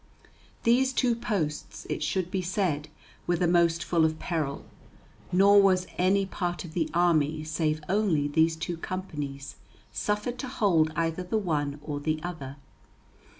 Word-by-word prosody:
These 260 Hz, +3 st, +3 dB
two 245 Hz, -2 st, +2 dB
posts, 190 Hz, -10 st, -3 dB
it -, -, -3 dB
should 185 Hz, -2 st, -1 dB
be 190 Hz, -2 st, 0 dB
said, 175 Hz, -5 st, -1 dB, 0.4 s
were 175 Hz, -, +2 dB
the 175 Hz, +1 st, +1 dB
most 170 Hz, -1 st, +3 dB
full 165 Hz, +2 st, +2 dB
of 160 Hz, 0 st, +1 dB
peril; 155 Hz, -6 st, -3 dB, 0.7 s
nor 200 Hz, +2 st, +6 dB
was 185 Hz, -2 st, +3 dB
any 195 Hz, +2 st, +3 dB
part 175 Hz, -2 st, -3 dB
of 160 Hz, -, -10 dB
the 165 Hz, -2 st, 0 dB
army 155 Hz, -3 st, +2 dB
save 155 Hz, -1 st, -1 dB
only 185 Hz, -7 st, +2 dB
these 160 Hz, +2 st, +2 dB
two 170 Hz, +1 st, -4 dB
companies 150 Hz, -7 st, -5 dB, 0.3 s
suffered 210 Hz, +4 st, -2 dB
to 260 Hz, -, -4 dB
hold 175 Hz, -11 st, +2 dB
either 165 Hz, +1 st, -1 dB
the 180 Hz, +5 st, -1 dB
one 150 Hz, -7 st, -1 dB
or 145 Hz, -2 st, -4 dB
the 155 Hz, +2 st, -1 dB
other. 145 Hz, -6 st, -6 dB
170 Hz, 150 wpm, -28 LUFS, 155-190 Hz, 0.7 s, nor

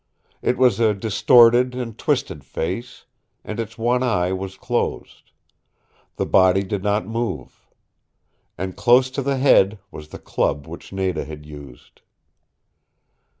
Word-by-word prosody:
It 125 Hz, -, 0 dB
was 125 Hz, -2 st, +3 dB
a 110 Hz, -2 st, +3 dB
distorted 120 Hz, +4 st, +4 dB
and 120 Hz, -4 st, -5 dB
twisted -, -, -2 dB
face, 115 Hz, +10 st, -5 dB, 0.4 s
and 110 Hz, -, -6 dB
its 115 Hz, 0 st, -5 dB
one 120 Hz, +2 st, +1 dB
eye 95 Hz, -8 st, 0 dB
was 95 Hz, 0 st, -6 dB
closed. -, -, -4 dB, 0.9 s
The -, -, -2 dB
body 95 Hz, +1 st, +4 dB
did 100 Hz, 0 st, -4 dB
not 105 Hz, -1 st, 0 dB
move. 110 Hz, -, -5 dB, 0.9 s
And 95 Hz, +1 st, -5 dB
close 125 Hz, +1 st, +4 dB
to 135 Hz, -, -3 dB
the 140 Hz, 0 st, -1 dB
head 110 Hz, -6 st, +4 dB
was 75 Hz, 0 st, -10 dB
the -, -, -10 dB
club 70 Hz, 0 st, -2 dB
which -, -, -11 dB
Nada 95 Hz, -3 st, -2 dB
had 75 Hz, +1 st, -10 dB
used. 75 Hz, -4 st, -13 dB
105 Hz, 135 wpm, -21 LUFS, 95-120 Hz, 0.9 s, distorted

